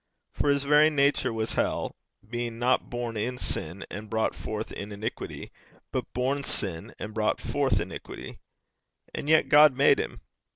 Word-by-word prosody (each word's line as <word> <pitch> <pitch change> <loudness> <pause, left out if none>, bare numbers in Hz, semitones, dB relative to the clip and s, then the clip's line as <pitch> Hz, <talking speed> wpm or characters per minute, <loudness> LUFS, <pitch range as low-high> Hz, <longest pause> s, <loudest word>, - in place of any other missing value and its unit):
For 145 - +1
his 140 -1 +3
very 150 +2 +6
nature 140 -4 +2
was 110 0 -2
hell, - - -1 0.3
being 120 0 -3
not 125 +2 +1
born 120 -1 -3
in 120 +4 -2
sin 90 -4 -4
and 105 +1 -7
brought 110 0 +1
forth 110 0 -5
in 100 +1 -6
iniquity, 105 +2 -5 0.4
but - - -3
born 135 +3 0
sin 90 -10 -2
and 105 - -6
brought 110 -1 +1
forth - - +1
iniquity. - - -7 0.7
And 145 - -4
yet 160 0 +5
God 150 -3 +7
made 140 - +5
him. - - -4
120 Hz, 160 wpm, -28 LUFS, 110-140 Hz, 0.7 s, God